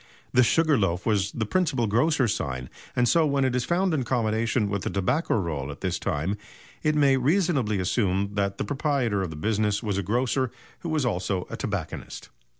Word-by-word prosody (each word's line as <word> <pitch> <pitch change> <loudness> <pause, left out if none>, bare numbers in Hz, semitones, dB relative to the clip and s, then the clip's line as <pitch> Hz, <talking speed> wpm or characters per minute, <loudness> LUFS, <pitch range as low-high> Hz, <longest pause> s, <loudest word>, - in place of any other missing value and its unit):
The 125 - +6
"Sugar 155 +2 +3
Loaf" 90 -3 0
was 100 -3 +1
the 110 - -2
principal 135 - +1
grocer's 120 +1 +2
sign, 65 -4 -4 0.2
and 120 0 +3
so 165 +6 +4
when 140 -1 +1
it 130 -1 0
is 125 - 0
found 180 +1 +1
in 150 - +1
combination 115 -2 0
with 100 -1 -2
the - - -2
tobacco 125 - 0
roll 75 -8 -2
at 70 - -8
this 90 -2 -1
time 80 +8 -1 0.4
it 155 0 +1
may 140 -2 +4
reasonably 140 - +1
be - - -1
assumed 100 0 0
that 100 -1 0
the - - -2
proprietor 135 -8 0
of 95 - -2
the 80 - -7
business 105 +5 0
was 100 -3 -1
a - - +1
grocer 125 +6 0 0.3
who 170 - -5
was 155 -4 0
also 95 -4 -1
a - - -3
tobacconist. - - -5
115 Hz, 200 wpm, -26 LUFS, 100-135 Hz, 0.4 s, The